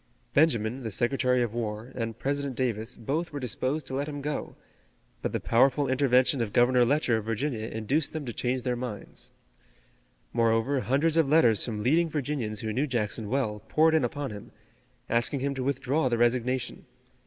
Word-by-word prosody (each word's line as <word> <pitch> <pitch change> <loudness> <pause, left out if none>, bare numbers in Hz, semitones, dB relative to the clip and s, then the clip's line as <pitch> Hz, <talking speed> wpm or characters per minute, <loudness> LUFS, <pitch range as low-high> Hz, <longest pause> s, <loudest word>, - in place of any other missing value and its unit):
Benjamin, 130 -5 +2
the 115 - -4
Secretary 125 +3 +1
of 115 -2 -3
War, 115 +1 -4
and 115 -2 -4
President 140 +1 -2
Davis 115 -2 -2
both 150 +9 -2
were 145 - -4
disposed 130 +4 -2
to - - -5
let 140 +2 -1
him 145 -1 -5
go, 145 +1 -4 0.7
but - - -2
the - - -1
powerful 135 +4 +3
intervention 130 -1 +3
of 110 -3 -3
Governor 125 +1 +5
Letcher 125 -2 +2
of 110 - -5
Virginia 115 0 -2
induced 130 +8 -1
them 155 -2 -5
to 120 - -5
change 125 +2 -1
their 125 -1 0
minds. 120 -5 -6 1.0
Moreover, 115 +3 +2
hundreds 140 +8 +1
of 160 -4 +3
letters 120 -9 +4
from 105 -3 -4
leading 165 +7 +3
Virginians 135 -8 -3
who 110 -1 -3
knew 140 +6 0
Jackson 110 -3 -2
well 115 -5 -1
poured 160 +1 +4
in 160 -3 +3
upon 135 +2 -3
him, 105 -1 -9 0.6
asking 120 +4 0
him 140 +1 0
to 135 -1 -3
withdraw 135 +1 0
the 120 - +1
resignation. 125 +2 0
125 Hz, 175 wpm, -28 LUFS, 115-140 Hz, 1.0 s, Governor